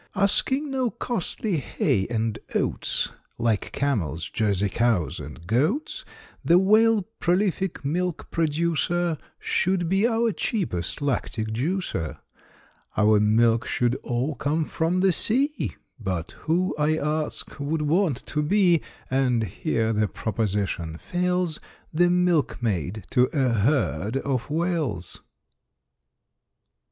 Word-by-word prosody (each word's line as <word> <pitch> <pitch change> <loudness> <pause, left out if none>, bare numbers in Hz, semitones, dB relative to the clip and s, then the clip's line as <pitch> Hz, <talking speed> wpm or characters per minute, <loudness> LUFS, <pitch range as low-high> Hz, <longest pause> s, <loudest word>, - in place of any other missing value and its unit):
Asking 265 +9 +2
no 260 -2 +1
costly 220 -4 -2
hay 100 -7 0
and 115 -2 -1 0.2
oats, - - 0 0.3
Like 115 -3 0
camels, 90 - -1
Jersey 100 -3 +1
cows, 100 -7 +1
and 75 +3 -9
goats, 175 - 0 0.4
The 170 - +5
Whale, 215 +2 +5 0.2
prolific 185 -2 0
milk 175 +3 -2
producer, 165 +1 0 0.2
Should 180 -2 0
be 195 +5 +3
our 230 -1 +2
cheapest 150 - -2
lactic 115 -4 -1
juicer. 125 - -2 0.8
Our 105 0 +5
milk 115 +2 +3
should 120 -1 +1
all 125 +5 -2
come 155 +3 0
from 170 +4 0
the 190 -1 +4
sea, 275 - 0 0.2
But 95 -6 -3
who, 175 +4 -1
I 155 +1 +2
ask, 150 0 -3
would 150 +2 -1
want 155 -3 +1
to 150 - -1
be, 175 0 +3 0.3
And 125 -3 +2
here 110 +3 -1
the 105 0 +2
proposition 100 -7 -2
fails, 180 - -1 0.3
The 175 +3 +4
milkmaid 120 - +1
to 125 0 +4
a 135 -4 +2
herd 115 - +1
of 135 -2 -2
Whales? 155 - -2
150 Hz, 115 wpm, -25 LUFS, 110-180 Hz, 0.8 s, The